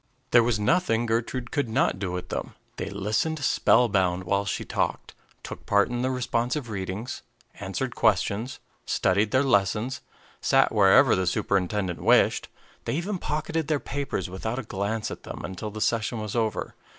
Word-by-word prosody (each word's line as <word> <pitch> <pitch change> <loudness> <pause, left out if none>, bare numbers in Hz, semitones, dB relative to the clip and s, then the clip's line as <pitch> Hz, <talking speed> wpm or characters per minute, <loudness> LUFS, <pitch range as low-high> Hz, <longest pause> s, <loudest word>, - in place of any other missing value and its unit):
There 120 - +7
was 115 -2 +1
nothing 115 - +2
Gertrude 120 +2 -2
could 145 -6 -1
not 110 - +1
do 95 -3 -2
with 90 0 -5
them. - - -4 0.2
They 100 - -4
listened 105 +11 -1
spellbound 95 -8 +3
while 100 +2 0
she 100 - -3
talked, - - -2 0.3
took - - -9
part 100 +3 +3
in 120 0 -2
the 130 - +1
responsive 125 +1 -1
readings, 100 +4 -4 0.4
answered - - -3
questions, 110 +6 +1 0.3
studied 100 +3 +2
their 130 +3 +3
lessons, 115 0 +1 0.4
sat - - +4
wherever 95 -2 +6
the 95 -1 -1
superintendent 95 0 0
wished; - - +3 0.4
they - - -1
even 180 +4 -2
pocketed 155 0 -2
their 155 -2 +1
papers 135 -11 -3
without 105 +6 -4
a 135 - -3
glance 105 +1 -3
at - - -7
them - - -8
until 95 +3 -5
the 110 +1 -7
session 115 +1 0
was 105 0 -5
over. 110 -2 -1
110 Hz, 165 wpm, -26 LUFS, 100-125 Hz, 0.4 s, There